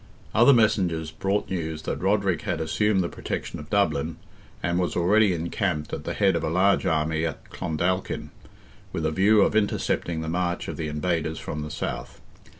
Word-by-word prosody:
Other 120 +5 +7
messengers 90 - +2
brought 100 +1 -1
news 80 -3 -3
that - - -3
Roderick 100 -1 +1
had - - -2
assumed 95 +6 +1
the - - -1
protection - - -5
of 75 - -10
Dublin, 80 -6 +1 0.5
and 85 +2 +1
was 90 - -1
already 100 +4 +4
encamped 85 -2 -2
at - - -4
the - - -3
head 95 -3 +3
of 85 - -1
a 80 - 0
large 95 +4 +3
army 80 0 +1
at 80 -2 -4
Clondalkin, 85 +3 -2 0.6
with 80 - -2
a 80 - +1
view 100 +5 +4
of 110 - +3
intercepting 85 -5 0
the 80 - -4
march 85 +1 -1
of - - -4
the 80 - -3
invaders 80 +1 -1
from 75 - -5
the 75 - -5
south. 75 - -5
85 Hz, 180 wpm, -25 LUFS, 80-100 Hz, 0.6 s, Other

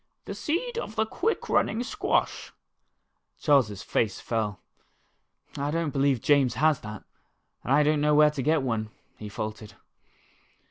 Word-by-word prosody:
"The - - -5
seed 460 +10 -2
of 220 - -6
the 220 - +2
quick 445 - -2
running 235 - +1
squash." - - -1 0.9
Charles's 125 - +2
face 105 -4 0
fell. 110 -4 -2 0.5
" - - -22
I 140 +1 -1
don't 165 -1 -1
believe 135 -3 +1
James 140 -5 +3
has 155 -2 +3
that, 105 -1 -8 0.6
and - - -3
I 145 +2 +5
don't 150 0 +2
know 150 0 +3
where 150 0 +6
to 145 -2 -4
get 155 +2 +2
one," 110 -4 -2 0.3
he 105 - -7
faltered. 105 0 -6
140 Hz, 150 wpm, -27 LUFS, 110-155 Hz, 0.9 s, where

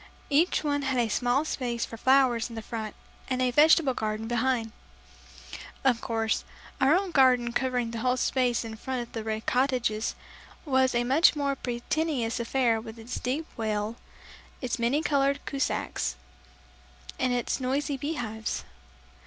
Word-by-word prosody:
Each 315 +5 +3
one 285 -1 0
had 265 -2 -1
a 235 -2 +2
small 245 +7 +1
space 240 -6 -2
for - - -9
flowers 255 -1 +3
in 230 -1 -6
front 220 -2 -5 0.3
and 255 -1 0
a 255 -1 +2
vegetable 300 0 +5
garden 215 -1 -3
behind. 240 -1 0 1.1
Of 250 -3 +3
course, 225 -1 -1 0.4
our 270 +5 +5
own 380 0 0
garden 250 -4 +4
covering 250 -2 0
the 230 - -4
whole 250 +2 +1
space 245 -2 +1
in 220 -1 -7
front 255 +1 -3
of 235 - -14
the 225 - -4
Red 220 0 -3
Cottages, 250 -4 +1 0.5
was 260 -3 +2
a 240 - +2
much 275 +8 +4
more 280 -1 0
pretentious 245 0 -2
affair 235 -1 +1
with 225 0 -9
its 230 +2 -6
deep 275 +6 -2
well, 215 0 -2 0.6
its 250 -2 -3
many 255 +7 +1
colored 280 -1 +2
kiosks, 270 - -2 1.0
and 255 - +1
its 245 +2 -1
noisy 275 +3 -1
bee 290 +4 -3
hives. 220 -4 -3
250 Hz, 155 wpm, -28 LUFS, 230-275 Hz, 1.1 s, vegetable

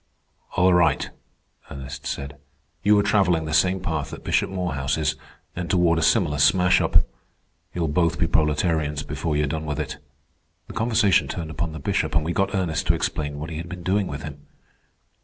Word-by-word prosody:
"All 90 +1 +5
right," 85 -1 +2 0.6
Ernest 65 -1 -7
said. 70 0 -5 0.4
"You 105 +1 +4
are 100 - +3
travelling 95 -6 +2
the 80 - -4
same 95 +3 +3
path 80 -6 -3
that - - -9
Bishop - - +1
Morehouse 75 -8 -2
is, - - 0 0.4
and 90 -1 -4
toward 85 -3 +3
a - - -1
similar 75 -2 +2
smash 90 +6 +4
up. - - +3 0.7
You'll 85 -2 0
both 85 +2 +1
be - - +2
proletarians 75 -1 +1
before 75 -2 -2
you're 75 - +2
done 80 +2 -3
with 75 -2 -3
it." - - -4 0.7
The - - -10
conversation 110 -5 +2
turned 80 -2 -5
upon 80 +3 -3
the 80 - -6
Bishop, - - -1
and 80 -1 +2
we 85 - -1
got 100 +2 0
Ernest 85 -5 -1
to - - +4
explain 75 -1 -2
what 80 +3 -6
he 80 - -5
had 85 +2 -6
been 90 -1 -7
doing 95 +2 +1
with 70 -1 -6
him. 75 -1 -9
80 Hz, 190 wpm, -24 LUFS, 75-90 Hz, 0.7 s, All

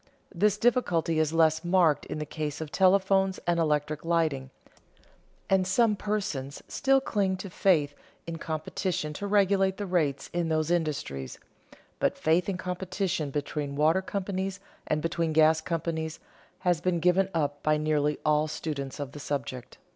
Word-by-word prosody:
This 205 +3 +2
difficulty 180 -9 +2
is 155 -1 +2
less 160 0 +3
marked 175 -4 +3
in - - -4
the 155 - -3
case 150 0 -4
of 155 -2 -6
telephones 190 0 +3
and 175 -1 +1
electric 150 -1 0
lighting, 160 -6 0 1.0
and 190 -1 +2
some 215 +3 +3
persons 195 -11 -3
still 270 0 +2
cling 200 -7 0
to 190 0 -8
faith 155 -7 +2 0.3
in 165 -1 -5
competition 155 0 -3
to 200 +7 -5
regulate 195 -1 +3
the 205 - -3
rates 160 -7 -1
in 175 -1 0
those 155 +1 0
industries; 145 - -2 0.6
but - - +1
faith 170 +4 +2
in 190 - -2
competition 180 -3 -2
between 145 0 -3
water 160 +5 +3
companies 195 0 -3 0.3
and 155 0 0
between 165 -1 -1
gas 160 0 +5
companies 160 -2 -3 0.4
has 175 -3 +1
been 175 -1 +1
given 180 +3 +3
up 145 -2 -1
by 155 0 +2
nearly 150 -1 +1
all 150 0 +3
students 145 -3 -5
of 140 -2 -4
the 150 - -9
subject. 130 -3 -5
165 Hz, 155 wpm, -28 LUFS, 150-190 Hz, 1.0 s, gas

